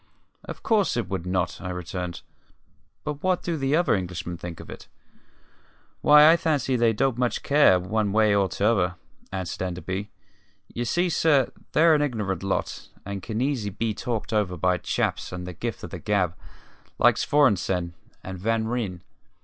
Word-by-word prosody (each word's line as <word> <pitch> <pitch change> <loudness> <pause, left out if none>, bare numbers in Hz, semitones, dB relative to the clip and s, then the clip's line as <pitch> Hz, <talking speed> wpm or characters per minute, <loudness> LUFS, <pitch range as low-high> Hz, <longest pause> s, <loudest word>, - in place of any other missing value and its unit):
"Of - - -9
course 205 - +2
it 120 - -1
would 95 -3 -3
not," 90 -1 -1
I 90 - -5
returned. 90 0 -5 0.8
"But 150 -1 -4
what 185 -1 +1
do 170 - -1
the 135 -1 +1
other 175 +2 +3
Englishmen 90 -2 -3
think 85 -1 -8
of - - -10
it?" - - -10 1.1
"Why, 150 +1 +8
I 170 - +5
fancy 145 -6 0
they 115 -2 +3
don't 125 +2 0
much 125 -1 0
care, 140 -11 +5
one 105 +3 -1
way 110 0 +4
or 100 -2 +2
t'other," 95 -3 +1 0.4
answered 95 -2 -4
Enderby. 95 +2 -4 0.6
"Ye 120 - -2
see, 175 +9 +1
sir, 150 -6 +3 0.2
they're 165 +1 +5
an 150 - +3
ignorant 105 - -2
lot, 95 0 -3 0.2
and 100 0 -5
can 110 +3 -3
easy 130 -6 0
be 110 +3 -2
talked 115 +1 -4
over 100 -4 0
by 90 +2 +1
chaps - - -2
with 90 0 -6
the 90 - -6
gift - - -5
of - - -7
the - - -6
gab, 95 -5 0 0.6
like - - +5
Svorenssen 95 -11 +2 0.3
and 95 -1 -7
Van 110 +3 0
Ryn. 105 -7 -3
105 Hz, 170 wpm, -25 LUFS, 90-135 Hz, 1.1 s, Why